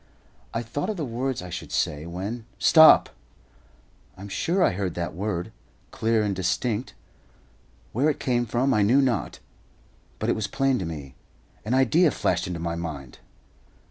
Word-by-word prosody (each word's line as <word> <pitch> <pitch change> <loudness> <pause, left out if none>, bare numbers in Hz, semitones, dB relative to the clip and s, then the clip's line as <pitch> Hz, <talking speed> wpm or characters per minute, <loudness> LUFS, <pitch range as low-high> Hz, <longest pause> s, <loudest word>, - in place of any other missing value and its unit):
I 115 - -3
thought 145 - -4
of 215 - -3
the 155 - -2
words 125 -2 -3
I 90 - -8
should - - -7
say, 75 +2 -1
when 100 +7 -5
"STOP!" 160 -1 +7 1.1
I - - -12
am 100 - -8
sure 180 - 0
I - - +4
heard 95 -1 -3
that 85 -1 -3
word, 90 -2 -3 0.4
clear 110 -1 +1
and 100 -2 -1
distinct. 95 +6 -2 1.0
Where 135 +7 +2
it 150 - -2
came 120 -2 0
from 125 +4 +1
I 105 - +3
knew 115 +7 +4
not; 125 -7 0 0.8
but - - -3
it - - +3
was 110 - -2
plain 135 -1 +1
to 95 - -3
me. 75 -5 -7 0.5
An 115 +4 0
idea 150 +7 +4
flashed - - -1
into 90 -2 -4
my 85 0 -2
mind! 75 -7 -6
110 Hz, 170 wpm, -25 LUFS, 90-130 Hz, 1.1 s, STOP